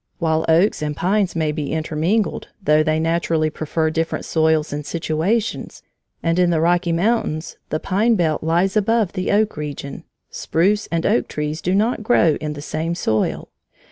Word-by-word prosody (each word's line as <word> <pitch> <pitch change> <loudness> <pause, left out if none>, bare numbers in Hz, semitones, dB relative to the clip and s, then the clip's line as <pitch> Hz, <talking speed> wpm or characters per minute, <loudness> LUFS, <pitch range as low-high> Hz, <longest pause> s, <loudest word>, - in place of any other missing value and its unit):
While 160 -1 0
oaks 170 +4 +3
and 150 -1 -3
pines 190 0 +1
may 160 -2 0
be 150 -2 -4
intermingled, 160 +7 -1
though 155 -5 +3
they 155 0 +1
naturally 165 -1 0
prefer 160 +1 -1
different 165 +1 -2
soils 160 -2 +1
and 150 0 -4
situations, 170 +8 -2 0.4
and 165 +1 +1
in 180 -1 +4
the 165 -2 +1
Rocky 175 +1 +2
Mountains 170 -3 -1
the 155 - -1
pine 215 +7 +1
belt 160 -5 0
lies 175 +5 +1
above 215 -1 +1
the 185 - -1
oak 215 +1 +2
region, 145 -2 -6 0.3
spruce 200 +6 0
and 165 -1 -1
oak 125 - +2
trees 150 +1 -4
do 180 +2 0
not 220 +4 +1
grow 190 -9 +3
in 150 -1 -3
the 145 -1 -8
same 160 +2 -3
soil. 110 -10 -1
165 Hz, 170 wpm, -20 LUFS, 155-190 Hz, 0.4 s, in